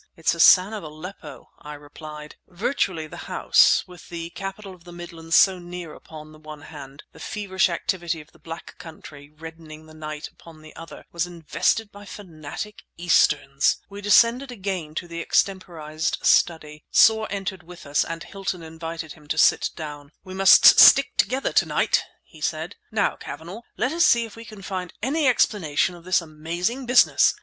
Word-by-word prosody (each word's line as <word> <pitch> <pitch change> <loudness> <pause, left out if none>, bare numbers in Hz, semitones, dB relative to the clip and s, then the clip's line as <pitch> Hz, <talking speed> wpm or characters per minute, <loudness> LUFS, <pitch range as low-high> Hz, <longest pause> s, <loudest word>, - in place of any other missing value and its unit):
"It's 165 - +1
Hassan 185 +4 +5
of 215 - -5
Aleppo!" 155 -1 -11
I 150 0 -9
replied. 150 +1 -11
Virtually, 185 - -2
the 155 - -10
house, - - +4
with 180 -2 -15
the 170 -1 -6
capital 195 +2 -7
of 180 -2 -18
the 175 - -13
Midlands 165 -2 -5
so 190 -2 +5
near 175 -2 -8
upon 155 -1 -12
the 155 - -16
one 155 -1 -11
hand, 140 -2 -11
the - - -17
feverish 190 -3 -1
activity 170 -1 -3
of 150 - -15
the - - -23
Black 165 0 -10
Country 145 -3 -12
reddening 160 0 -12
the 155 - -16
night 155 -1 -7
upon 160 -2 -17
the 155 - -14
other, 165 0 -11
was 170 0 -2
invested 175 +5 -1
by 205 0 -13
fanatic 185 +1 -9 0.2
Easterns! 150 -5 +2
We 200 +1 -8
descended 235 +6 +3
again 190 -8 -5
to 175 - -4
the 170 0 -6
extemporized 165 -5 -1
study. 155 -3 +1
Soar 220 -1 +4
entered 195 -2 -4
with 175 0 -13
us 145 +1 +1
and 165 0 -6
Hilton 190 -3 -5
invited 165 0 -7
him 150 -2 -19
to 160 - -3
sit - - +4
down. 150 -2 -9
"We 185 -1 -10
must 190 0 +7
stick 275 0 +7
together 265 +1 0
to - - +4
night!" - - +1 0.2
he 155 - -18
said. 160 +4 -3
"Now, 215 -2 0
Cavanagh, 170 +9 -9 0.2
let 245 +5 0
us 340 +1 +2
see 235 -1 +3
if 220 - -13
we 230 0 -11
can 215 -3 -12
find 185 -2 -5
any 285 +4 +1
explanation 185 - +1
of 175 -1 -14
this 185 0 +2
amazing 170 - -4
business. 250 0 +4
170 Hz, 175 wpm, -23 LUFS, 155-195 Hz, 0.2 s, must